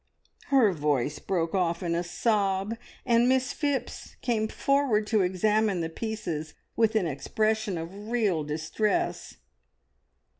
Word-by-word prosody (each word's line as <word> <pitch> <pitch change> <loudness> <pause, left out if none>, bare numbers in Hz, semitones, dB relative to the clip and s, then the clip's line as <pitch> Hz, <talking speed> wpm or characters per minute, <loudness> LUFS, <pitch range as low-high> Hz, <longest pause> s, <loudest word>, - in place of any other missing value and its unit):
Her 255 -8 +4
voice 145 -2 0
broke 170 -2 -1
off 175 -2 0
in 170 -1 0
a 170 - +1
sob, 195 +2 0 0.3
and 240 0 +4
Miss 260 +1 +2
Phipps 285 -3 -3
came 220 -3 +1
forward 270 -4 +1
to 210 -1 +2
examine 195 +1 +1
the 165 - -2
pieces 170 -6 -4 0.2
with 225 -1 +2
an 215 -5 +3
expression 215 - -1
of 190 +6 -7
real 210 -10 +1
distress. 165 - -1
210 Hz, 125 wpm, -27 LUFS, 170-225 Hz, 0.3 s, Her